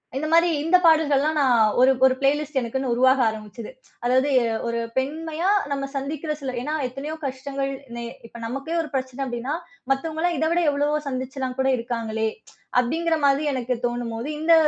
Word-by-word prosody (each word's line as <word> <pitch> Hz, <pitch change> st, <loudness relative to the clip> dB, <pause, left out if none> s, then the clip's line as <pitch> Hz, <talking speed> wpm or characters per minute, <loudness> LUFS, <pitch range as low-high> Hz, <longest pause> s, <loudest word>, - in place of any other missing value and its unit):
இந்த 280 Hz, -, -1 dB
மாதிரி 335 Hz, +1 st, +5 dB
இந்த 335 Hz, +3 st, +5 dB
பாடல்கள்லாம், 310 Hz, -2 st, +4 dB
நான் 235 Hz, -5 st, +4 dB
ஒரு 260 Hz, +1 st, +6 dB
ஒரு 260 Hz, -, +5 dB
பிளேலிஸ்ட் 285 Hz, 0 st, +1 dB
எனக்குன்னு 255 Hz, +2 st, -2 dB
உருவாக 260 Hz, +2 st, +4 dB
ஆரம்பிச்சது. 215 Hz, +1 st, -8 dB, 0.3 s
அதாவது, 255 Hz, +3 st, +3 dB
எ -, -, +1 dB, 0.2 s
ஒரு 235 Hz, 0 st, -1 dB, 0.2 s
பெண்மையா 320 Hz, +6 st, -1 dB, 0.2 s
நம்ம 275 Hz, -1 st, -1 dB
சந்திக்கிற 295 Hz, +3 st, -3 dB
சில 265 Hz, -2 st, -3 dB
ஏன்னா, 300 Hz, +5 st, -3 dB
எத்தனையோ 280 Hz, +5 st, -6 dB
கஷ்டங்கள் 275 Hz, +1 st, -3 dB, 0.2 s
நே 235 Hz, -, -5 dB, 0.2 s
இப்ப 235 Hz, -, -12 dB
நமக்கே 275 Hz, +7 st, -4 dB
ஒரு 305 Hz, -, -6 dB
பிரச்சனை 260 Hz, -1 st, -3 dB
அப்படினா, 250 Hz, +3 st, -3 dB, 0.4 s
"மத்தவங்கல்லாம் 320 Hz, +5 st, 0 dB
இத 315 Hz, -, +1 dB
விட 350 Hz, -, +2 dB
எவ்வளவோ 290 Hz, +1 st, +1 dB
சந்திச்சுலாம் 260 Hz, -1 st, -4 dB
கூட 265 Hz, -, +2 dB
இருக்காங்களே!" 225 Hz, -2 st, -2 dB, 0.5 s
அப்படிங்கிற 320 Hz, +6 st, +1 dB
மாதிரி, 280 Hz, +1 st, +3 dB
எனக்கு 250 Hz, -1 st, -1 dB
தோணும் 240 Hz, -1 st, -2 dB
போது 240 Hz, +6 st, -4 dB
இந்த 325 Hz, +2 st, +4 dB
270 Hz, 165 wpm, -24 LUFS, 250-305 Hz, 0.5 s, ஒரு